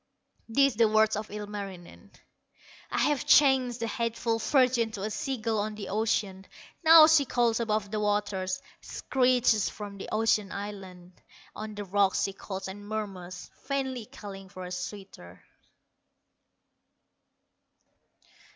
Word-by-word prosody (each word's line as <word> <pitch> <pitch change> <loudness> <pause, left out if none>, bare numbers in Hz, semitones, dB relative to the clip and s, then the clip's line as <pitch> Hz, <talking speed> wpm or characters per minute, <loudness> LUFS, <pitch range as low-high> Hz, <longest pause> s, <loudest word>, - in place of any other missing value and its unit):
These 275 0 +3
the 230 -1 +5
words 215 0 +3
of 210 +1 -5
Ilmarinen: 205 -4 -8 0.8
"I - - -3
have 295 -3 +1
changed 260 -4 +4
the - - 0
hateful 230 0 -1
virgin 250 -2 +2
To 200 -3 -5
a 215 - -2
sea 265 +4 -3
gull 220 -1 -1
on 210 +1 -3
the 210 -2 -7
ocean; 200 -2 -1 0.4
Now 320 -1 +9
she 315 -2 +5
calls 240 -3 +1
above 215 -3 -1
the 215 - -1
waters, 205 -3 -1 0.2
Screeches 250 -5 +1
from 200 -1 -9
the - - -7
ocean 215 -2 +1
islands; 190 -3 -8 0.4
On 215 0 -7
the 205 0 -5
rocks 195 0 +2
she 195 - -2
calls 190 -1 -6
and 205 +2 -9
murmurs, 190 -4 -6 0.2
Vainly 265 -5 -2
calling 200 -7 -10
for 185 0 -9
a 180 - -8
suitor." 180 - -8
210 Hz, 135 wpm, -28 LUFS, 195-235 Hz, 0.8 s, Now